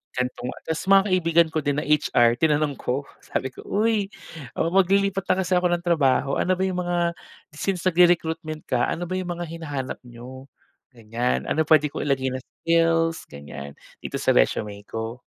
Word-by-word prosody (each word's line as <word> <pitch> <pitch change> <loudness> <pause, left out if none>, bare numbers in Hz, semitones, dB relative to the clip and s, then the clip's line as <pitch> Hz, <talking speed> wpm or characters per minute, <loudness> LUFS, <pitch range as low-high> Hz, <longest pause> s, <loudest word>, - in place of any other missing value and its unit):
Gantong 125 0 -3 0.2
tas 160 -1 -2
mga 195 +1 +6
kaibigan 170 -3 +3
ko 160 - 0
din 145 0 0
na - - -4
HR 120 -5 +3
tinanong 150 +1 +1
ko 135 +3 -3 0.2
sabi 130 - -2
ko, 130 - -12
"Uy, 210 -1 0 0.5
o - - +2
maglilipat 195 0 +3
na 185 - +2
kasi 180 +1 0
ako 180 0 +3
ng 175 0 0
trabaho 140 -5 +2
ano 185 - 0
ba 185 0 +1
'yong 185 -1 -2
mga 175 0 -1 0.6
since 185 +4 -2
nagre-recruitment 165 -3 +2
ka 120 -1 +1
ano 175 +1 -3
ba 185 - -3
'yong 185 -1 -3
mga 175 - -3
hinahanap 150 -5 -5
n'yo? 125 +2 -11 0.5
Ganyan, 115 - -2
ano 155 - 0
pwede 150 -2 +4
ko - - -5
ilagay 135 -2 0
na 130 - -3
skills," 165 +2 0
ganyan, 70 0 -9 0.2
"dito - - -6
sa - - +2
resume 100 - +1
ko?" 115 +2 -5
155 Hz, 175 wpm, -24 LUFS, 130-175 Hz, 0.6 s, mga